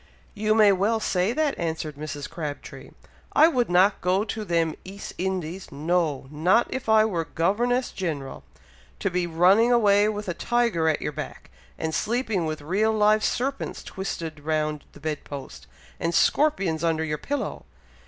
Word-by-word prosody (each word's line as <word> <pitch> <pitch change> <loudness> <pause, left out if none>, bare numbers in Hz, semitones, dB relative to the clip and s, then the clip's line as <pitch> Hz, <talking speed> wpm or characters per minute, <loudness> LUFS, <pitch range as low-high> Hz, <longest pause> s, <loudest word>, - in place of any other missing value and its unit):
"You 215 0 +1
may 215 -2 +6
well 205 +4 +1
say 185 -1 +1
that," 300 +2 0
answered 160 -2 -3
Mrs. 145 -1 -6
Crabtree. 155 -3 -7 0.4
"I 315 - +7
would 250 - +1
not 185 +3 +4
go 185 +3 +2
to 220 0 -4
them 165 -4 +1
East 195 +2 -8
Indies 185 -1 -3
no! 155 -1 0
not 180 +10 +3
if 260 -3 -4
I 220 0 +6
were 175 -7 -1
Governess 240 - 0
General, 150 - -4 0.5
to 200 - -1
be 180 0 0
running 185 +8 +4
away 210 -3 +4
with 210 -1 -4
a 175 - -1
tiger 235 -8 +1
at 155 - -1
your - - -2
back, - - -8 0.3
and 160 0 -3
sleeping 220 -6 0
with 155 -1 -4
real 200 +8 +1
live 215 0 +3
serpents 270 +3 -2
twisted 165 -5 -5
round 155 0 -2
the - - -14
bed 150 0 -4
post, 140 -2 -9 0.3
and 170 0 -1
scorpions 195 - +2
under 160 -1 +1
your 150 -2 -3
pillow! 285 - -4
180 Hz, 165 wpm, -25 LUFS, 160-215 Hz, 0.5 s, I